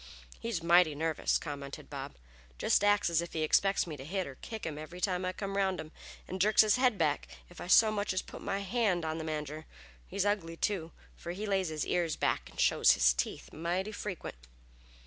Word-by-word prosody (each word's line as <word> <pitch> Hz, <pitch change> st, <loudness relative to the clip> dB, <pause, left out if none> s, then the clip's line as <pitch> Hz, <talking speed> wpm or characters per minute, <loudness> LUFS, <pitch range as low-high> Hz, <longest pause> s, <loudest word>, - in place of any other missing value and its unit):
"He's 225 Hz, -8 st, -3 dB
mighty 170 Hz, -2 st, +5 dB
nervous!" 160 Hz, +1 st, +1 dB
commented 140 Hz, -3 st, -7 dB
Bob. -, -, -7 dB, 0.4 s
"Jest 200 Hz, -, +2 dB
acts 205 Hz, 0 st, +4 dB
as 170 Hz, -1 st, +2 dB
if 170 Hz, -, -7 dB
he 160 Hz, -, -1 dB
expected 195 Hz, +5 st, +3 dB
me 155 Hz, -4 st, -6 dB
to 135 Hz, -, -8 dB
hit 185 Hz, +5 st, -2 dB
or 140 Hz, -, -7 dB
kick 220 Hz, -, -7 dB
him 150 Hz, -2 st, -4 dB
every 165 Hz, +4 st, -8 dB
time 180 Hz, -1 st, 0 dB
I 185 Hz, -, 0 dB
come 195 Hz, +1 st, -5 dB
round 190 Hz, -2 st, +1 dB
him, 155 Hz, -, -7 dB, 0.4 s
'nd 185 Hz, -, -2 dB
jerks 215 Hz, +2 st, +6 dB
his 215 Hz, +2 st, +3 dB
head 250 Hz, -4 st, +3 dB
back 150 Hz, -4 st, 0 dB, 0.2 s
if 175 Hz, -, -11 dB
I -, -, -6 dB
so 215 Hz, +4 st, +6 dB
much 205 Hz, -1 st, -1 dB
as 185 Hz, -, -1 dB
put -, -, -10 dB
my 195 Hz, 0 st, -2 dB
hand 200 Hz, -4 st, 0 dB
on 160 Hz, +1 st, -2 dB
the -, -, -4 dB
manger. 155 Hz, 0 st, -5 dB, 0.4 s
He's 200 Hz, +1 st, -1 dB
ugly, 175 Hz, -5 st, -1 dB
too, 170 Hz, -5 st, -1 dB, 0.2 s
fer 170 Hz, -, -6 dB
he 205 Hz, +4 st, -4 dB
lays 190 Hz, -4 st, 0 dB
his 155 Hz, -2 st, -2 dB
ears 170 Hz, -3 st, 0 dB
back -, -, -1 dB
and -, -, -14 dB
shows -, -, +5 dB
his -, -, +4 dB
teeth -, -, -4 dB
mighty 175 Hz, +6 st, -2 dB
frequent." 190 Hz, -, -6 dB
175 Hz, 215 wpm, -31 LUFS, 155-200 Hz, 0.4 s, jerks